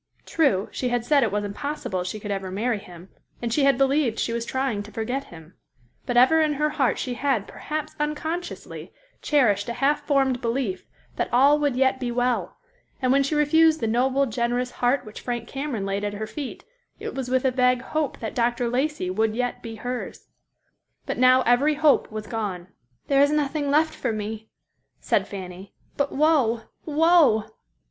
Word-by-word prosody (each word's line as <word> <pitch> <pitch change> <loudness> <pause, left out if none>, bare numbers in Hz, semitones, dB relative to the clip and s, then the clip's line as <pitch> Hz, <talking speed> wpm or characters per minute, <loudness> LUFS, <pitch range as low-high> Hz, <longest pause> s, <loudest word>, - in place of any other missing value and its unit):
True, 240 - +1
she 250 - -2
had 240 -1 -1
said 290 +1 +4
it 225 -5 +1
was 205 0 -1
impossible 205 -2 -4
she 200 +4 -5
could 205 0 -5
ever 195 -1 -3
marry 215 +4 -1
him; 180 -1 -13 0.3
and 235 -1 -3
she 285 0 +3
had 275 -3 +4
believed 270 -3 +2
she 230 - -1
was 235 0 -2
trying 260 -6 -1
to 205 +1 -10
forget 245 +6 -3
him; 160 0 -14 0.5
but 245 - 0
ever 290 +6 +6
in 305 -1 +2
her 300 +1 0
heart 265 -3 +1
she 250 - -3
had, 250 -5 0
perhaps 310 0 -5
unconsciously, 315 +4 -4 0.3
cherished 225 -8 +2
a - - -2
half 290 +4 +1
formed 270 -3 +2
belief 230 -5 -2 0.3
that - - -2
all 280 +5 +5
would 290 -4 +1
yet 260 0 +2
be 245 - -2
well, 240 -6 -1 0.4
and 255 -2 +1
when 275 +1 +4
she 275 +3 -1
refused 315 +2 +4
the 230 - -1
noble, 260 +5 +2
generous 245 +1 -1
heart 250 +1 0
which 215 - -10
Frank 240 -2 -4
Cameron 270 -7 -4
laid 195 +1 -2
at 205 0 -2
her 215 +1 -4
feet, 275 +3 -7 0.4
it - - -5
was 265 -2 -4
with 260 +1 +1
a 260 - +3
vague 250 0 +2
hope 310 -1 -2
that 220 - -4
Dr. 240 0 0
Lacey 260 -6 -1
would 220 +3 0
yet 245 +1 -2
be 225 -1 -7
hers. 245 +3 -6 0.8
But - - -3
now 255 0 +6
every 275 +6 +3
hope 300 -5 +3
was 215 0 -5
gone. 200 -6 -4 0.4
"There 275 -1 +3
is 285 - +5
nothing 295 -1 0
left 315 +2 +3
for - - -2
me," 215 0 -5 0.5
said - - 0
Fanny, 185 -1 -9 0.2
"but 280 0 0
woe, 275 -7 +2 0.2
woe!" 310 -7 +4
250 Hz, 185 wpm, -24 LUFS, 220-285 Hz, 0.8 s, ever